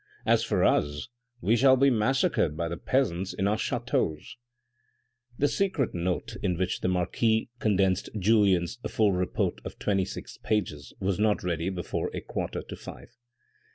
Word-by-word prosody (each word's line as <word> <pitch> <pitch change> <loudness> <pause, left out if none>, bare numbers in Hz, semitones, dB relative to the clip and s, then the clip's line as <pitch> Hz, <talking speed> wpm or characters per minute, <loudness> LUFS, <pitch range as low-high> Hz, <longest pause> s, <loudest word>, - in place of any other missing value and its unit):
As - - +3
for - - +1
us, 75 0 +1 0.3
we 110 +6 +3
shall 130 +2 +5
be 135 +1 +5
massacred 120 - +1
by 85 -1 -1
the 85 - -3
peasants 95 -6 0
in 95 - 0
our 105 - +2
ch&teaus." 120 - -2 1.0
The 145 - +3
secret 185 - 0
note 90 +6 -2
into 90 -4 0
which 90 0 -1
the - - 0
marquis 110 +6 +1
condensed 95 -3 +1
Julien's 100 0 +3
full 105 -2 +2
report 90 -1 -1
of - - -8
twenty 95 -2 +1
six - - -8
pages 75 -11 -2
was 95 0 -1
not 105 -1 +2
ready 85 0 -1
before 90 -3 -3
a - - -3
quarter - - -4
to - - -8
five. - - -11
100 Hz, 155 wpm, -28 LUFS, 90-115 Hz, 1.0 s, shall